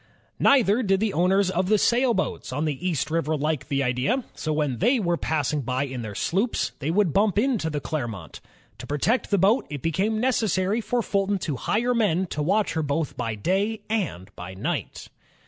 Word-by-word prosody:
Neither 245 -4 +4
did 195 -4 +2
the 215 -1 0
owners 185 +3 +2
of 185 +1 0
the 215 - +5
sailboats 235 - +1
on 145 +5 -1
the 155 +4 -2
East 155 -2 -2
River 160 -1 0
like 150 -2 -2
the 140 -1 0
idea, 130 - 0
so 155 - -3
when 150 -5 -1
they 245 +6 +3
were 175 -4 +1
passing 150 -3 -1
by 130 +1 -1
in 130 -3 -5
their 110 -3 -6
sloops 200 - 0
they 140 - -2
would 180 -2 +2
bimip 205 0 +2
into 220 -8 +1
the 150 -1 -2
Clermont. 120 - -5 0.4
To - - -8
protect 180 - 0
the 200 - +2
boat, 200 +7 +3
it 145 -3 -6
became 200 +7 0
neces 240 -3 +1
sary 190 +5 +1
for 240 +1 -1
Fulton 200 0 0
to 150 - -2
hire 235 - 0
men 190 -6 +1
to 150 - -2
watch 200 +7 +1
her 160 - 0
both 150 0 -2
by 115 -1 -3
day 200 - -1
and 100 - -3
by 90 +2 -8
night. 95 - -4
175 Hz, 200 wpm, -25 LUFS, 145-210 Hz, 0.4 s, the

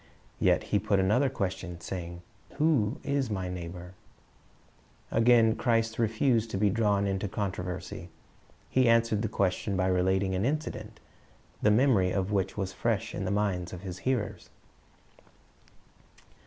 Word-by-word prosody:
Yet - - +3
he 105 - +5
put 100 -1 +1
another 110 +9 +3
question, 95 -6 -4
saying, 85 -1 -6 0.3
"Who 145 -6 +2
is 140 -3 0
my 95 -3 -3
neighbor?" 90 0 -7 1.2
Again 115 -1 +5
Christ 115 -2 0
refused 115 +1 +2
to 100 - -3
be 100 0 +3
drawn 105 -2 +2
into 95 +1 -1
controversy. 90 -2 -4 0.6
He 130 -2 +3
answered 115 -2 +3
the 110 - 0
question 95 +1 0
by 95 - +1
relating 95 +1 +1
an 95 +1 0
incident, 115 -6 -3 0.6
the 105 - +4
memor\ 105 -4 +4
of 95 +1 -1
which 95 -1 -1
was 95 -1 -3
fresh 115 -4 -1
in 95 - -3
the - - -1
minds 95 -3 -1
of 90 - -7
His 90 -2 -7
hearers. 125 -6 -2
100 Hz, 140 wpm, -29 LUFS, 95-115 Hz, 1.2 s, he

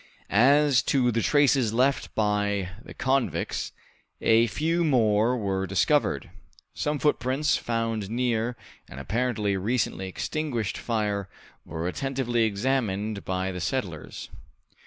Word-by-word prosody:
As 135 +5 +5
to 125 -3 +3
the 115 0 0
traces 135 -3 +3
left 130 +4 +1
by 105 -3 0
the - - -12
convicts, 135 0 -1 0.5
a 115 +1 +4
few 165 +8 0
more 120 -4 +3
were 95 -3 -1
discovered. 95 0 +1 0.4
Some 150 0 -1
footprints 145 0 +1
found 115 -3 -2
near 120 0 -1 0.3
an 65 - -10
apparently 105 - -1
recently 100 -2 -1
extinguished 120 - -3
fire 105 -4 -2 0.4
were 85 +1 -3
attentively 125 0 0
examined 105 -2 -1
by 95 0 -2
the 90 -1 -5
settlers. 85 - -4
115 Hz, 115 wpm, -26 LUFS, 100-130 Hz, 0.5 s, As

